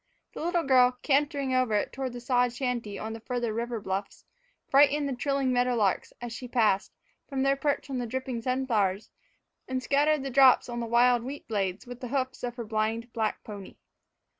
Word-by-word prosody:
The - - -7
little 345 0 +1
girl, 255 -2 +4
cantering 280 -2 +1
over 255 -4 +2
it 205 - -1
toward 265 -2 -4
the 245 - -6
sod 245 0 +1
shanty 240 -5 -3
on 220 +3 -5
the 225 - -7
farther 240 -1 -2
river 235 +1 -3
bluffs, 195 0 -5 0.4
frightened 285 +1 +4
the 275 - -2
trilling 275 0 0
meadow 245 0 +2
larks, 205 -5 0
as 240 -1 -6
she 250 +2 -7
passed, 220 -5 +1 0.4
from 270 -2 -1
their 275 0 +3
perch 285 +1 -1
on 265 -2 -3
the 240 - -3
dripping 260 0 -3
sunflowers, 225 -6 0 0.6
and 260 0 -2
scattered 290 +2 +2
the 270 - -4
drops 265 0 +6
on 240 0 -4
the 235 - -3
wild 240 +1 +4
wheat 270 +4 -7
blades 195 -1 -2
with 245 0 -9
the 250 - -5
hoofs 260 0 -2
of 240 -1 -3
her 235 -2 -5
blind 225 +2 -2
black 220 -2 -2
pony. 205 -3 -9
245 Hz, 195 wpm, -28 LUFS, 225-265 Hz, 0.6 s, drops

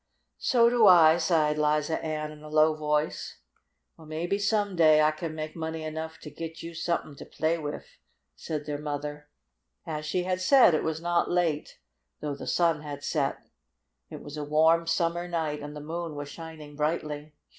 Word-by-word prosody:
"So 235 -2 +4
do 235 -3 +5
I," 165 -3 +8
sighed 160 -3 +2
Liza 150 +1 +1
Ann 155 -1 -3
in 150 0 -13
a 155 - -10
low 155 +1 +4
voice. 150 0 -2 0.6
"Well, 160 - -15
maybe 170 +6 -2
some 205 -1 +1
day 155 -2 +6
I 155 0 +4
can 155 +1 -6
make 155 0 -5
money 160 -1 -4
enough 160 +1 -5
to 150 - -9
git 165 +2 -7
you 170 0 -7
somethin' 165 -3 -2
to - - -9
play 160 +2 -1
wif," 150 -1 -7 0.4
said 150 -2 -5
their 145 -1 -4
mother. 145 0 -5 0.6
As 155 -3 -4
she 180 +3 0
had 185 0 -1
said, 245 -1 +6
it 155 - +2
was 160 0 -2
not 175 0 +1
late, 170 -4 0 0.4
though 150 -1 -3
the 140 - -8
sun 165 -3 +2
had 145 -1 -7
set. 140 -4 -1 0.6
It - - -9
was 145 +1 -8
a 150 - -3
warm, 160 +3 +3
summer 170 +1 0
night, 160 -4 -2
and 145 +1 -7
the - - -6
moon 165 +1 -5
was 145 0 -6
shining 160 -3 -10
brightly. 150 -1 -3
155 Hz, 185 wpm, -28 LUFS, 150-170 Hz, 0.6 s, I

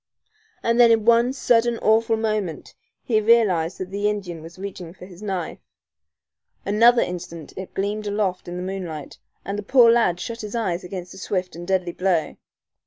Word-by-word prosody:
And 230 +1 +1
then 240 -1 +8
in 225 -2 +3
one 235 +1 +4
sudden, 240 -3 +2
awful 225 +1 +2
moment 215 -7 -3 0.3
he 220 -3 +1
realized 205 -7 +3
that 185 0 -6
the 205 +1 0
Indian 185 -6 -5
was 165 +3 -12
reaching 185 -3 -8
for 180 - -11
his 180 0 -14
knife. 190 -5 -4 1.1
Another 230 +4 +5
instant 170 -3 -7
it 190 0 -8
gleamed 205 +2 -2
aloft 200 -3 -1
in 175 0 -5
the 180 - -4
moonlight, 180 -6 -6 0.3
and 200 +1 -3
the - - -3
poor 235 +2 +5
lad 230 -7 +2
shut 230 +5 -5
his 210 +1 -6
eyes 190 -6 -1
against 180 0 -7
the 190 - -11
swift 185 -3 -3
and 175 +1 -8
deadly 185 -2 0
blow. 180 -3 0
195 Hz, 175 wpm, -23 LUFS, 180-225 Hz, 1.1 s, then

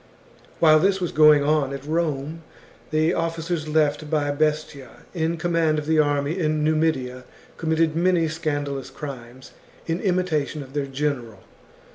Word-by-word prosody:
While 155 -2 +6
this 195 +3 +2
was 175 -2 -2
going 150 -1 +6
on 145 -2 +1
at 140 0 -7
Rome, 155 -1 -2 0.5
the 155 +2 +2
officers 165 -1 -2
left 150 -1 +1
by 145 -2 0
Bestia 150 -2 -2
in 165 -1 -1
command 165 -2 +1
of 150 - -3
the 160 0 +2
army 145 +3 +1
in 155 -2 0
Numidia 150 -5 0 0.3
com 160 - -4
mitted 160 -1 +2
many 170 -1 +2
scandalous 145 -4 -3
crimes 130 -3 -9 0.3
in 165 +1 -2
imitation 175 -6 -1
of 135 0 -15
their 145 -1 -2
general. 135 -7 -3
155 Hz, 145 wpm, -23 LUFS, 145-165 Hz, 0.5 s, While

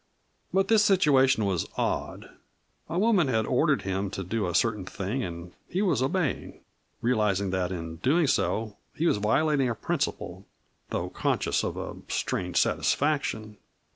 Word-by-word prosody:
But 195 0 +2
this 220 0 +5
situation 140 - +4
was 95 -4 -1
odd - - -2 0.6
a 165 - -2
woman 200 -6 +3
had 110 -4 +1
ordered 140 +4 +2
him 95 +1 -2
to 95 - -5
do 100 +2 -2
a 90 - -3
certain 105 0 +1
thing 105 +7 -3
and 85 -1 -7 0.2
he 190 +4 0
was 160 - +1
obeying, 150 +3 -1 0.4
realizing 105 -5 +1
that 95 -1 -1
in 80 -2 -5
doing 150 - +2
so 110 -5 0 0.2
he 165 - -1
was 165 - +3
violating 135 +6 +2
a 115 - -2
principle, - - -3 0.4
though - - -3
conscious - - 0
of - - -3
a - - -5
strange 90 -1 -2
satisfaction. 110 -8 0
115 Hz, 150 wpm, -27 LUFS, 95-155 Hz, 0.6 s, this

